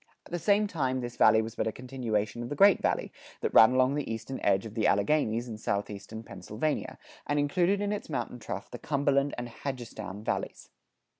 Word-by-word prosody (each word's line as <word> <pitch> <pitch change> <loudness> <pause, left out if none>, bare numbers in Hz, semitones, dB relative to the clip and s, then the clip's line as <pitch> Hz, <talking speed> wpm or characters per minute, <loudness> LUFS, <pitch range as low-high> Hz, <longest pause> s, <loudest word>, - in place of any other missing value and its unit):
At - - -16
the 175 - -2
same 205 +4 +3
time 130 -9 -1
this 120 0 -5
valley 110 +1 +5
was 110 0 -6
but - - -1
a - - 0
continuation 120 -3 -3
of 120 - -5
the 145 - -3
Great 200 +5 +6
Valley, - - 0 0.3
that - - -1
ran 110 +3 +8
along 130 +1 +3
the 145 -5 -2
eastern 115 +4 -5
edge 95 +3 +2
of 110 - -7
the 110 -2 +1
Alleghanies 115 +2 +2
in 110 -2 -7
southeastern 100 +2 -4
Pennsylvania, 110 - -3 0.3
and 145 - 0
included 175 +7 +2
in 205 0 0
its 205 - -5
mountain 130 -4 -3
trough 100 -3 -6
the 120 - -7
Cumberland 140 -1 +1
and 120 0 -4
Hagerstown 115 -6 -6
valleys. - - -3
125 Hz, 200 wpm, -29 LUFS, 110-145 Hz, 0.3 s, ran